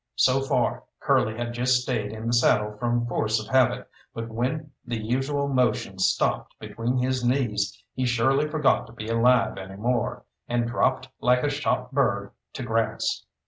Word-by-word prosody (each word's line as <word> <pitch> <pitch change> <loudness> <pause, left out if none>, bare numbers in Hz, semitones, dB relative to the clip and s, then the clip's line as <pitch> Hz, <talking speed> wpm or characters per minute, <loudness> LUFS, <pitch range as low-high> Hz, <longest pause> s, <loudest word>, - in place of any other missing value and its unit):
So 130 +1 +3
far 135 - 0
Curly 110 +1 +1
had 120 0 -3
just 125 +1 +2
stayed 115 -6 -2
in 110 0 -7
the 115 - 0
saddle 105 -3 +3
from 120 -1 0
force 110 -2 0
of 110 - -8
habit, 130 -2 +3 0.3
but 115 0 -5
when 135 +7 -2
the 120 - -3
usual 135 +6 -1
motion 120 -7 0
stopped 95 - 0
between 120 +3 -2
his 130 0 0
knees 120 -6 0
he 130 -1 -1
surely 135 +5 +2
forgot 150 -2 +2
to 115 - -14
be 110 -2 -7
alive 115 -2 +3
any 95 0 -8
more, 120 +2 -1 0.2
and 120 0 0
dropped 125 +2 0
like 125 0 +3
a 145 - +2
shot 135 -3 -1
bird 100 -8 +1 0.2
to 130 - -5
grass. 115 -2 -1
120 Hz, 170 wpm, -25 LUFS, 110-130 Hz, 0.3 s, So